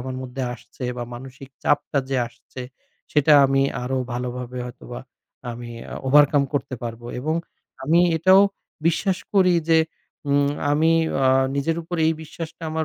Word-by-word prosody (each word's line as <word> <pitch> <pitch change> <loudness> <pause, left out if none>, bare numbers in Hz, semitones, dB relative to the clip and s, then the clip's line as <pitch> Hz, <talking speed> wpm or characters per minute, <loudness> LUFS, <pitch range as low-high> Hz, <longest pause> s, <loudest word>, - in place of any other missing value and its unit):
আমার 130 +1 -5
মধ্যে 130 +1 -5
আসছে 125 - -10
বা 120 - -3
মানসিক 130 +2 -10
চাপটা 145 0 +1
যে 135 - +1
আসছে 120 +2 -11 0.5
সেটা 150 +1 +4
আমি 135 0 +2 0.2
আরও 130 +1 -1
ভালোভাবে 125 0 -4
হয়তোবা 120 0 -9 0.5
আমি 120 0 -8 0.2
আ - - -5
overcome 145 0 +5
করতে 140 -2 -2
পারবো। 120 0 -6
এবং 155 +4 -1 0.5
আমি 165 +5 +4 0.2
এটাও 185 +4 +6 0.5
বিশ্বাস 180 +3 +1 0.2
করি 185 -2 +5
যে 165 -1 +6 0.5
উম 140 0 +3 0.2
আমি 160 +3 +3 0.3
আ - - +5 0.3
নিজের 160 +4 0
উপর 175 +2 -5
এই 160 - +3
বিশ্বাসটা 165 +1 -9
আমার 160 0 -1
140 Hz, 150 wpm, -23 LUFS, 125-160 Hz, 0.5 s, এটাও